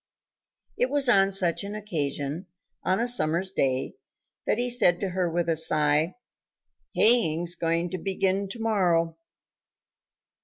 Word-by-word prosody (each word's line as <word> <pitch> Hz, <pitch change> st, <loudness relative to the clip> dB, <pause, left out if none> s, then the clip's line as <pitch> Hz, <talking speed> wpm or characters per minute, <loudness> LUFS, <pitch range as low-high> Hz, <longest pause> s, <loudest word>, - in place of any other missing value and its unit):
It 250 Hz, -, +1 dB
was 285 Hz, -1 st, +2 dB
on 195 Hz, -4 st, +4 dB
such 185 Hz, -2 st, 0 dB
an 200 Hz, +1 st, -6 dB
occasion, 155 Hz, -4 st, -4 dB, 0.3 s
on 185 Hz, -, 0 dB
a 235 Hz, -, 0 dB
summer's 185 Hz, -6 st, +1 dB
day, 130 Hz, -8 st, -2 dB, 0.5 s
that -, -, +1 dB
he 245 Hz, +1 st, 0 dB
said 215 Hz, -8 st, +3 dB
to 195 Hz, -, -3 dB
her 180 Hz, -1 st, -1 dB
with 170 Hz, +1 st, -2 dB
a 165 Hz, -, +1 dB
sigh, 155 Hz, +1 st, +2 dB, 0.8 s
"Haying's 175 Hz, -7 st, +3 dB
going 170 Hz, 0 st, -2 dB
to 185 Hz, -, -4 dB
begin 195 Hz, +1 st, -1 dB
to 230 Hz, -, -7 dB
morrow." 175 Hz, -7 st, 0 dB
180 Hz, 140 wpm, -25 LUFS, 165-205 Hz, 0.8 s, on